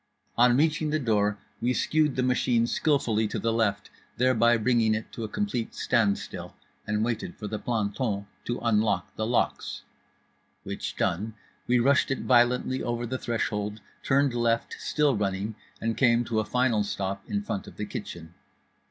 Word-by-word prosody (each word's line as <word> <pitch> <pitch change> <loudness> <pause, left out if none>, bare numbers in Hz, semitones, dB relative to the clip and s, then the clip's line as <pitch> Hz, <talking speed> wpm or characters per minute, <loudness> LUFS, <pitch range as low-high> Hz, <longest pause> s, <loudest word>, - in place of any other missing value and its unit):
On 120 +1 +5
reaching 155 +1 +2
the 155 - +1
door 105 -6 +1 0.2
we 125 +2 +1
skewed 155 -3 +2
the 130 - +1
machine 125 -2 +2
skillfully 120 -5 +1
to - - -4
the 115 0 0
left, 105 -3 0 0.3
thereby 120 -1 +4
bringing 115 -1 +2
it 110 - -5
to 115 - -6
a - - -2
complete 125 - -2
standstill, 110 -5 0 0.3
and 105 +1 +1
waited 115 -2 -3
for 105 - -7
the 105 +1 -3
planton 105 -2 -1 0.2
to 120 - -2
unlock 105 -5 +1
the 110 - -2
locks; 120 0 -1 0.8
which - - -5
done, 105 +6 -1 0.3
we 125 - +4
rushed 140 +4 +3
it 135 - -1
violently 125 +1 +3
over 120 0 -2
the 130 +2 -3
threshold, 105 -2 -2 0.2
turned 140 -1 +2
left, 115 -1 0
still 150 -4 +1
running, 100 +1 -1 0.3
and 115 0 -1
came 120 -2 +4
to 110 -1 0
a 110 - 0
final 125 -4 +2
stop 100 -1 -3
in 205 0 -1
front 100 - -4
of - - -12
the - - -3
kitchen. 85 -1 -7
115 Hz, 165 wpm, -27 LUFS, 105-125 Hz, 0.8 s, On